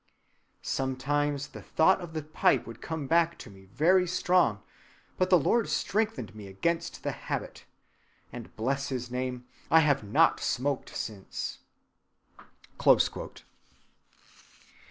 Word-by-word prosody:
Sometimes 140 +2 -1
the - - -10
thought 190 +4 +3
of 170 -2 -8
the 155 -2 -3
pipe 155 -1 +2
would 115 0 -10
come 160 -3 -4
back 170 +3 +2
to - - -11
me 95 0 -16
very 170 - +3
strong; 175 - +2 0.6
but 185 0 +2
the 180 - +7
Lord 225 - +1
strengthened 220 - -1
me 105 -2 -10
against 165 - -2
the - - -1
habit, - - -5 0.7
and, - - -9
bless 135 +5 -1
his 125 -2 -4
name, 125 -1 -3 0.2
I 160 - +7
have 145 -5 +2
not 145 +11 +3
smoked 135 +2 -2
since." 100 -4 -5
145 Hz, 120 wpm, -29 LUFS, 125-170 Hz, 0.7 s, the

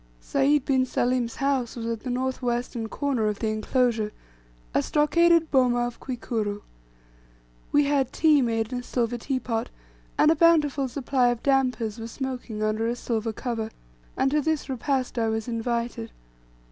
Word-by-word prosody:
Sayd 280 - +2
bin 260 -2 +3
Salim's 245 -1 0
house 270 -4 0
was 230 -2 -5
at 230 -1 -2
the 255 - -6
north 260 +2 -2
western 240 -2 -2
corner 265 -6 0
of 210 -1 -1
the 220 - -1
inclosure, 220 0 0 0.6
a - - +3
stockaded 330 +2 +3
boma 245 -3 +3
of 240 -1 -6
Kwikuru. 220 -5 -3 1.1
We 290 - +5
had 280 -3 +1
tea 305 -3 +4
made 225 -1 -1
in 250 - -1
a - - -8
silver 240 -1 -1
tea 260 +2 -1
pot, 230 -1 -2 0.5
and 305 - +5
a - - +3
bountiful 300 -4 +3
supply 255 0 +1
of 240 -1 -1
"dampers" 250 -5 +1
were 225 - -5
smoking 245 -3 -5
under 215 +1 0
a 235 - 0
silver 225 -2 -2
cover; 225 -1 -3 0.5
and 270 - +2
to 300 +1 +2
this 315 -1 -1
repast 260 -1 -1
I 225 -1 +1
was 220 +1 -2
invited. 235 - -2
245 Hz, 165 wpm, -26 LUFS, 230-275 Hz, 1.1 s, We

